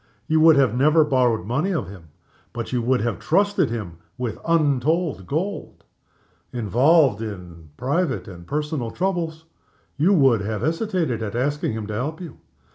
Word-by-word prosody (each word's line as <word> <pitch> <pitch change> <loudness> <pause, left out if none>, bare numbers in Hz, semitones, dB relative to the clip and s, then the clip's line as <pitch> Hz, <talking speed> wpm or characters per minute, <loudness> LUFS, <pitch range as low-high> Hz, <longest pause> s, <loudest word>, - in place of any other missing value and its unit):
You 160 0 +2
would 160 -1 +6
never 140 +5 +4
have 150 - -6
borrowed 120 -7 +2
money 140 - -1
of 140 - -2
him 95 -3 -11 0.5
but 115 +1 -5
you 125 - +1
would 125 +1 +1
have 120 +1 -2
trusted 200 - +2
him 100 -8 -6 0.2
with 125 -3 -4
untold 155 - +1
gold. 185 +8 -4 0.7
Involved 125 - +3
in 90 -7 -8
private 135 - -1
and 85 -3 -11
personal 150 -4 -2
troubles, 165 0 -2 0.5
you 165 +7 +3
would 135 - +4
have 105 +1 -3
hesitated 165 - -1
at 110 0 -4
asking 140 0 -1
him 110 -1 -4
to 105 - -6
help 145 +9 -3
you. 170 -7 -9
130 Hz, 155 wpm, -22 LUFS, 110-160 Hz, 0.7 s, would